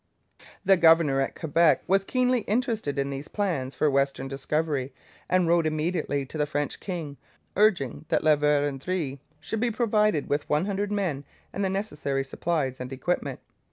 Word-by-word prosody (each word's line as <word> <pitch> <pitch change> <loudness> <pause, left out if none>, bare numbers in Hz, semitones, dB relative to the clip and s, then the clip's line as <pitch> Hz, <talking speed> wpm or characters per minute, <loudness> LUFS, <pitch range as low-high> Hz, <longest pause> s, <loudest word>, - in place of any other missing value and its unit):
The 195 0 +6
governor 160 -5 +5
at 135 - -3
Quebec 165 +1 +3
was 195 +1 +3
keenly 250 +3 +1
interested 220 - -1
in 140 0 -1
these 140 +2 -6
plans 165 -11 -2
for 155 - +2
western 140 -1 +1
discovery, 140 -1 -2 0.3
and 180 -2 +3
wrote 170 -1 +3
immediately 155 -2 -1
to 155 +4 -7
the 150 - +1
French 145 0 -2
king, 165 -7 -5 0.4
urging 170 - +2
that - - +1
La 155 -1 +5
Vérendrye 145 +1 0 0.2
should 155 +9 -4
be 240 +2 +1
provided 215 - +1
with 145 +1 -1
one 150 +4 +2
hundred 205 0 -2
men 180 -9 -1 0.3
and 200 - -2
the 190 - +1
necessary 150 -9 -2
supplies 135 -2 -2
and 125 +1 -6
equipment. 175 +7 -2
155 Hz, 160 wpm, -26 LUFS, 140-190 Hz, 0.4 s, The